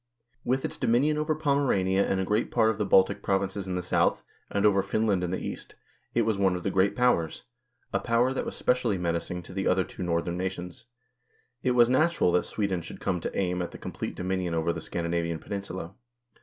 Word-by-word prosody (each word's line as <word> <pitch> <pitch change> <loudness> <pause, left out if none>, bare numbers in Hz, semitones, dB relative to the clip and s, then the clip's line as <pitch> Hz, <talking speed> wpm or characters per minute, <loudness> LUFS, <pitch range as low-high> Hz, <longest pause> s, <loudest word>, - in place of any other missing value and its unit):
With 130 +2 0
its - - -4
dominion 145 +6 +2
over 155 +1 0
Pomerania 130 -11 +2
and 95 - 0
a 95 - 0
great 105 +4 0
part 110 -2 +3
of 110 - -6
the 105 - +1
Baltic 95 0 +4
provinces 95 0 -1
in 90 - -2
the 90 - -2
south, 90 - +1 0.3
and 100 +1 0
over 100 -2 +5
Finland 100 -1 0
in 90 - -1
the 95 - -1
east, - - -7 0.4
it - - +4
was 110 -3 0
one 95 -2 +3
of 90 - -5
the 100 - 0
Great 95 +1 +2
Powers 125 -11 +1 0.5
a - - +2
power 120 +2 +2
that - - -2
was - - -5
specially 125 -5 +1
menacing 90 0 -2
to 90 - -11
the 95 0 -1
other 95 0 +3
two - - -10
Northern 85 0 -1
nations. 90 0 -5 0.8
It 125 -1 +1
was 120 -1 +6
natural 155 - +3
that 90 - +2
Sweden 100 -4 -2
should 85 - -9
come 90 -2 -1
to - - -5
aim 90 -1 0
at 85 - -3
the - - -10
complete - - -5
dominion 90 -2 -2
over 80 +1 +1
the 80 - -6
Scandinavian 85 0 -2
peninsula. 95 -1 -6
95 Hz, 210 wpm, -28 LUFS, 90-110 Hz, 0.8 s, was